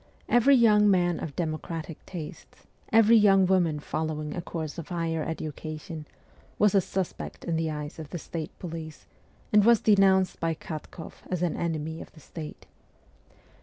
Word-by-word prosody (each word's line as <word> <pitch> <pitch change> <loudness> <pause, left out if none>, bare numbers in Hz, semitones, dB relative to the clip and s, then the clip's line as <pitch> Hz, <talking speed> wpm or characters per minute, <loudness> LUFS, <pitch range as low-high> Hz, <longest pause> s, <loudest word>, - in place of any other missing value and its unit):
Every 245 +4 +5
young 210 -4 +5
man 175 -3 +2
of 145 -4 -6
democratic 165 -1 -4
tastes, 165 -5 -9 0.3
every 225 +1 +6
young 195 -3 +6
woman 175 -5 +2
following 155 0 -3
a 175 - -3
course 165 -2 -5
of 165 - -7
higher 165 -2 -1
education, 155 0 -6 0.5
was 210 -2 +4
a 195 - +5
suspect 185 -1 -4
in 170 - -1
the 160 0 0
eyes 150 +1 -5
of 155 -2 -7
the 175 - -5
state 160 -1 -5
police, 160 -3 -7 0.5
and 210 -1 +7
was 230 0 +6
denounced 195 -3 +4
by 165 -1 0
Katkoff 160 +1 -8
as 180 -1 -1
an 175 - 0
enemy 160 -1 -3
of - - -11
the 155 - -15
state. 155 0 -9
165 Hz, 160 wpm, -27 LUFS, 155-190 Hz, 0.5 s, and